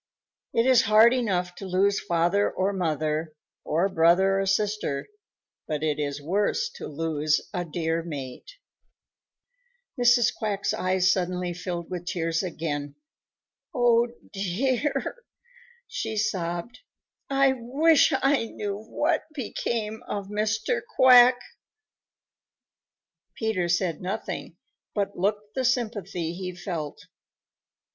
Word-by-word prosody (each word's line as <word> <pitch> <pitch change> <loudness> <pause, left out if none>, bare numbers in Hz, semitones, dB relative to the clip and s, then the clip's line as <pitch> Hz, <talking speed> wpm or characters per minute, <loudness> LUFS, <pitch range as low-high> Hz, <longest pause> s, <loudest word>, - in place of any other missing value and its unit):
It 230 - +2
is 255 -2 +6
hard 220 +3 +7
enough 185 -8 0
to 195 - -7
lose 195 +2 +2
father 175 +4 +1
or 190 +2 -1
mother 155 -3 -1 0.3
or 170 +5 +1
brother 190 +2 +3
or 195 - -1
sister, 200 -7 -1 0.6
but 155 -1 -2
it 150 -1 0
is 145 -1 -2
worse 205 - 0
to - - -6
lose 155 -1 0
a 180 -2 -1
dear 165 0 -1
mate." 145 - -7 1.5
Mrs. 240 -1 +4
Quack's 205 -3 -1
eyes 185 0 +2
suddenly 180 -1 -1
filled 175 -1 -5
with 175 -1 -5
tears 165 -3 -1
again. 155 -5 -4 0.8
"Oh, 240 -1 +4 0.3
dear," 255 - -1 0.6
she 220 - -4
sobbed, 185 0 -2 0.5
"I 275 -1 +4
wish 280 +7 +3
I 270 -3 +3
knew 205 -2 -4
what 305 +9 -1
became 220 -4 -3
of 200 -1 -4
Mr. 215 - 0
Quack." 250 -1 +8 2.0
Peter 205 -6 -1
said 175 -2 0
nothing, 190 +4 -5 0.4
but 200 -1 -1
looked 205 +3 -1
the 260 - -1
sympathy 205 -9 -1
he 180 0 -6
felt. 160 -5 -5
195 Hz, 110 wpm, -26 LUFS, 170-225 Hz, 2.0 s, Quack